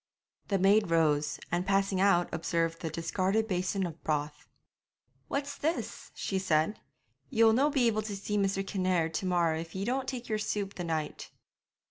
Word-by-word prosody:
The 200 Hz, -, +1 dB
maid 200 Hz, +1 st, +4 dB
rose, 150 Hz, -3 st, +2 dB
and 175 Hz, +1 st, +1 dB
passing 195 Hz, 0 st, +1 dB
out 185 Hz, -3 st, +4 dB
observed 165 Hz, 0 st, -1 dB
the 165 Hz, -, -2 dB
discarded 190 Hz, +7 st, 0 dB
basin 185 Hz, 0 st, 0 dB
of 165 Hz, -2 st, -8 dB
broth. 150 Hz, -1 st, -2 dB, 0.8 s
'What's 280 Hz, 0 st, -2 dB
this?' 320 Hz, +4 st, -3 dB
she 190 Hz, -, -2 dB
said. 170 Hz, +2 st, +1 dB, 0.5 s
'Ye'll 225 Hz, -3 st, +5 dB
no 275 Hz, +6 st, +3 dB
be 275 Hz, -4 st, +2 dB
able 215 Hz, -2 st, +2 dB
to 210 Hz, -1 st, -5 dB
see 200 Hz, +1 st, -3 dB
Mr. 195 Hz, -1 st, +1 dB
Kinnaird 185 Hz, -4 st, 0 dB
to 185 Hz, +4 st, -2 dB
morrow 170 Hz, -3 st, +2 dB
if 165 Hz, +1 st, -8 dB
ye 190 Hz, +1 st, -2 dB
don't 260 Hz, +3 st, -1 dB
take 250 Hz, -2 st, -4 dB
yer 215 Hz, -1 st, -1 dB
soup 205 Hz, -2 st, -2 dB
the 175 Hz, -, -5 dB
night.' 160 Hz, -3 st, -3 dB
190 Hz, 170 wpm, -30 LUFS, 165-210 Hz, 0.8 s, Ye'll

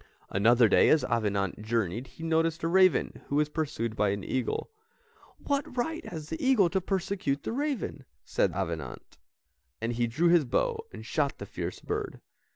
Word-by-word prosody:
Another 115 Hz, +4 st, +5 dB
day -, -, +5 dB
as 155 Hz, -, +4 dB
Avenant 105 Hz, -5 st, -1 dB
journeyed 110 Hz, +1 st, -1 dB
he 160 Hz, -, -12 dB
noticed 165 Hz, 0 st, +1 dB
a -, -, +2 dB
raven 185 Hz, +1 st, +3 dB
who 140 Hz, -, -2 dB
was 150 Hz, 0 st, +2 dB
pursued 145 Hz, -8 st, -2 dB
by 105 Hz, -1 st, +2 dB
an 100 Hz, 0 st, -2 dB
eagle. 130 Hz, -, -2 dB, 0.7 s
"What 280 Hz, -3 st, -2 dB
right 320 Hz, +7 st, -1 dB
has 155 Hz, -3 st, -7 dB
that 325 Hz, -, -4 dB
eagle 250 Hz, -, +4 dB
to 190 Hz, -, +1 dB
persecute 185 Hz, -6 st, -1 dB
the -, -, -3 dB
raven? 275 Hz, -, -2 dB, 0.2 s
thought -, -, +1 dB
Avenant, -, -, -5 dB, 0.6 s
and 115 Hz, +1 st, -2 dB
he 120 Hz, 0 st, 0 dB
drew 155 Hz, +10 st, +2 dB
his 170 Hz, -4 st, +5 dB
bow 450 Hz, -, -1 dB
and -, -, -9 dB
shot -, -, 0 dB
the -, -, -7 dB
fierce -, -, -5 dB
bird. 425 Hz, -1 st, -4 dB
155 Hz, 170 wpm, -29 LUFS, 115-195 Hz, 0.7 s, Another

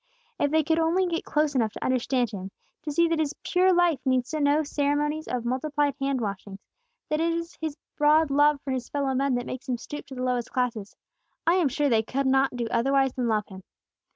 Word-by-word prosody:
"If 285 Hz, -, +2 dB
they 315 Hz, +1 st, +2 dB, 0.2 s
only 330 Hz, +3 st, +2 dB
could 355 Hz, -, -3 dB
get 330 Hz, -, -2 dB
close 300 Hz, -1 st, +1 dB
enough 225 Hz, -5 st, +1 dB
to -, -, -6 dB
understand 255 Hz, -1 st, 0 dB
Him; 190 Hz, -2 st, -6 dB, 0.3 s
to 305 Hz, -1 st, -4 dB
see 335 Hz, +3 st, +3 dB
that 330 Hz, -1 st, 0 dB
His 310 Hz, -1 st, -1 dB
pure 370 Hz, +1 st, +3 dB
life 350 Hz, -5 st, +3 dB
needs 255 Hz, +2 st, 0 dB
no 295 Hz, 0 st, +2 dB
ceremonies 295 Hz, +2 st, -1 dB
of 245 Hz, -2 st, -3 dB
multiplied 285 Hz, +3 st, 0 dB
hand 275 Hz, -2 st, -1 dB
washings; 200 Hz, -2 st, -5 dB, 0.5 s
that 305 Hz, +1 st, 0 dB
it 335 Hz, 0 st, +2 dB
is 335 Hz, +1 st, -4 dB
His 315 Hz, -2 st, -3 dB, 0.2 s
broad 300 Hz, 0 st, +4 dB
love 290 Hz, +1 st, +4 dB
for 275 Hz, -, -4 dB
His 255 Hz, -2 st, -3 dB
fellow 280 Hz, -2 st, -1 dB
men 270 Hz, 0 st, +1 dB
that 245 Hz, 0 st, -2 dB
makes 260 Hz, +1 st, -7 dB
Him 245 Hz, -, 0 dB
stoop 295 Hz, +5 st, -8 dB
to 270 Hz, -, -9 dB
the 255 Hz, -, -4 dB
lowest 250 Hz, -2 st, -1 dB
classes, 235 Hz, -5 st, -2 dB, 0.5 s
I 335 Hz, -, +4 dB
am 355 Hz, -6 st, +3 dB
sure 290 Hz, +3 st, 0 dB
they 225 Hz, -4 st, +3 dB
could 270 Hz, +5 st, -2 dB
not 265 Hz, 0 st, +2 dB
do 240 Hz, -1 st, -2 dB
otherwise 270 Hz, +1 st, +2 dB
than 250 Hz, -2 st, -1 dB
love 215 Hz, -2 st, +1 dB
Him. 190 Hz, -1 st, -11 dB
275 Hz, 220 wpm, -26 LUFS, 250-305 Hz, 0.5 s, broad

